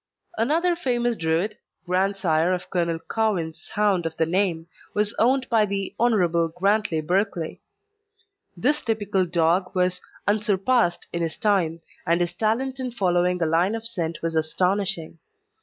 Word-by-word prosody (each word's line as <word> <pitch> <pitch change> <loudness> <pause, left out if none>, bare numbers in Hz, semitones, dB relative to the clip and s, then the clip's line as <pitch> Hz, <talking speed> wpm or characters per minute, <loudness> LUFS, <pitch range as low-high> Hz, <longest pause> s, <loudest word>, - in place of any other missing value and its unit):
Another 330 +9 +2
famous 240 -6 0
Druid 165 +5 -1 0.3
grandsire 185 -2 +1
of 180 - -9
Colonel 170 -2 0
Cowen's 175 -8 -1
hound 200 -5 +1
of 160 - -8
the 160 - +2
name 175 -1 0 0.3
was 210 +1 +1
owned 260 +3 +3
by 225 -2 +3
the 195 -1 -2
Hon. 180 -8 +3
Grantley 195 -4 +1
Berkeley. 180 0 -1 1.0
This 290 - +2
typical 205 -5 0
dog 175 +3 +1
was 180 0 +1 0.3
unsurpassed 210 0 +2
in 170 - -1
his 165 -1 -2
time, 175 -6 +1 0.3
and 170 +1 +3
his 175 -1 0
talent 255 +5 -1
in 255 -1 -2
following 180 -5 +1
a - - +2
line 170 +6 +2
of 225 0 -6
scent 170 -9 -3
was 165 -1 -1
astonishing. 175 +1 0
190 Hz, 140 wpm, -24 LUFS, 170-220 Hz, 1.0 s, owned